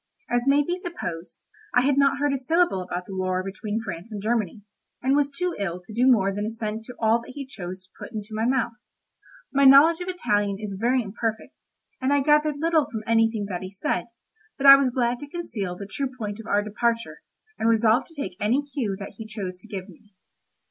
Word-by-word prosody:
As 245 +1 +1
may 285 +1 +5
be 355 +5 -2
supposed, 180 - -6 0.3
I 250 - +6
had 275 +2 +2
not 280 0 +3
heard 290 0 +1
a - - +1
syllable 320 - +2
about 180 0 -5
the 195 - -7
war 185 0 -1
between 205 +3 -4
France 190 +2 -7
and 210 - -5
Germany, 215 -2 -1 0.4
and 265 +2 +2
was 285 -1 +2
too 360 +5 -2
ill 180 -3 -2
to 180 +4 -13
do 245 +4 +3
more 195 -4 +3
than 205 +1 -3
assent 220 0 -4
to 250 - -9
all 225 +1 +3
that 255 - -11
he 280 -1 -5
chose 185 -6 -8
to 185 - -33
put - - -8
into 215 -1 -6
my 215 +1 -1
mouth. 250 -2 +1 0.8
My 280 0 +3
knowledge 285 +5 +7
of 355 - -4
Italian 205 - 0
is 210 -2 -5
very 250 +2 +2
imperfect, 220 +2 -5 0.4
and 260 +2 +1
I 285 0 +4
gathered 300 +1 +3
little 320 -1 +2
from 220 -2 -5
anything 225 -2 +2
that 180 -3 -3
he 185 - -6
said; 190 -2 -2 0.5
but 275 - -3
I 275 0 +12
was 275 -2 +2
glad 245 -1 0
to 290 - -9
conceal 210 - -4
the 200 - -7
true 265 +7 -3
point 210 -2 -5
of 225 - -9
our 205 0 +2
departure, 230 +2 -1 0.4
and 225 - +2
resolved 230 +2 +3
to 325 -3 -14
take 185 -9 -4
any 245 +8 +1
cue 225 -8 -1
that 200 0 -9
he 220 - -7
chose 195 -4 -6
to 225 - -14
give 195 -3 -6
me. 205 +2 -18
225 Hz, 220 wpm, -25 LUFS, 200-275 Hz, 0.8 s, I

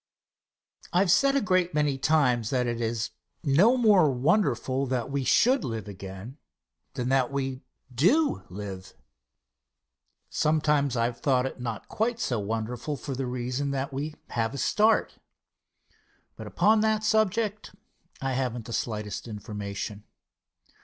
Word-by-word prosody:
Answer. - - -17
I - - +6
have 190 -3 +3
said 275 +6 +4
a 275 - +3
great 185 -5 +1
many 145 -3 +1
times 130 -7 +2
that 125 -2 +1
it 120 -1 -2
is 115 -1 -2 0.3
no 175 - +4
more 205 - +5
wonderful 135 - +1
that 130 0 -2
we 140 -1 -1
should 255 - +3
live 115 -3 -4
again 100 - -9 0.6
than 125 0 -2
that 135 -1 +2
we 135 -1 -3 0.3
do 270 - +3
live. 95 -1 -8 1.3
Sometimes 150 -4 +1
I 115 - +2
have 120 0 -3
thought 130 -3 +2
it 135 - -5
not 115 -3 -5
quite 230 +2 -1
so 120 - -1
wonderful 115 +7 -3
for 135 +2 -5
the 130 0 -3
reason 125 +3 -2
that 135 +1 -3
we 150 +3 -4 0.2
have 115 +2 -1
a - - -4
start. 215 - +2 1.2
But - - -8
upon 215 +1 +3
that 215 0 +1
subject 215 -1 0 0.4
I 135 -1 -2
have 130 -2 -1
not 120 -2 -7
the 115 - -7
slightest 105 -1 -3
information. 105 -1 -6
135 Hz, 145 wpm, -27 LUFS, 115-170 Hz, 1.3 s, I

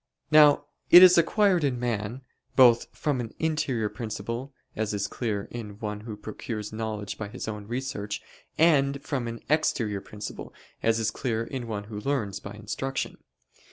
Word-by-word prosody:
Now 150 -1 +7 0.2
knowledge 175 +1 +11
is 180 -1 +8
acquired 185 0 +3
in 130 -4 0
man, 120 +1 -3 0.3
both 120 -3 +6
from 140 -5 -1
an 115 -1 -7
interior 145 -8 0
principle, 115 +4 -5 0.2
as 105 -1 -1
is 100 0 -1
clear 105 -2 -2
in 105 -4 -7
one 105 -2 -4
who 110 -1 -7
procures 105 0 -6
knowledge 110 -2 -4
by 105 - -3
his 115 +3 -7
own 105 -2 -5
research; 115 -4 -3 0.4
and 140 -4 +4
from 130 -6 -2
an 115 0 -6
exterior 115 -9 +1
principle, 105 +1 -8 0.3
as 115 0 +2
is 110 -1 0
clear 115 -1 -2
in 120 0 -5
one 105 -2 -3
who 105 0 -7
learns 105 -6 -1
(by 100 - -8
instruction). 115 +6 -4
115 Hz, 160 wpm, -27 LUFS, 105-135 Hz, 0.4 s, knowledge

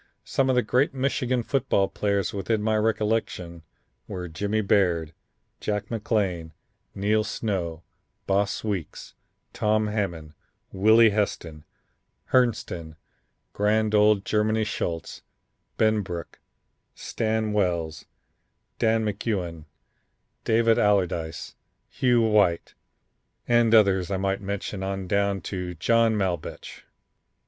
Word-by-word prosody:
Some 135 -1 +1
of 130 - +3
the 125 - +3
great 135 +4 +1
Michigan 130 -2 0
football 115 -7 +1
players 100 -1 -1
within 105 +2 -1
my 110 0 +1
recollection 105 -6 -1 0.5
were 90 -1 -5
Jimmy 100 +6 -1
Baird, 85 -6 +1 0.5
Jack 105 -1 -3
McLain, 100 -7 -1 0.4
Neil 105 +2 +1
Snow, 85 -8 -3 0.4
Boss 100 +1 0
Weeks, 100 -7 -5 0.4
Tom 110 0 +1
Hammond, 90 -8 -3 0.4
Willie 110 +3 +5
Heston, 85 -7 -3 0.7
Herrnstein, 105 -10 +1 0.6
grand 105 +1 +1
old 105 -1 +4
Germany 110 +1 +1
Schultz, 85 -5 -4 0.6
Benbrook, 100 -6 -1 0.6
Stan 110 -1 -2
Wells, 85 -6 -1 0.7
Dan 110 0 +2
McGugin, 95 -6 -3 0.8
Dave 115 +1 +2
Allerdice, 90 -6 0 0.4
Hugh 120 -2 +2
White 105 -6 +2 0.7
and 120 -1 +4
others 95 -4 +4
I 95 - -1
might 95 +1 -1
mention 100 0 -4
on 95 0 -3
down 100 0 0
to 90 -1 -5
John 115 +6 +2
Maulbetsch." 95 -5 -4
105 Hz, 105 wpm, -25 LUFS, 90-110 Hz, 0.8 s, Willie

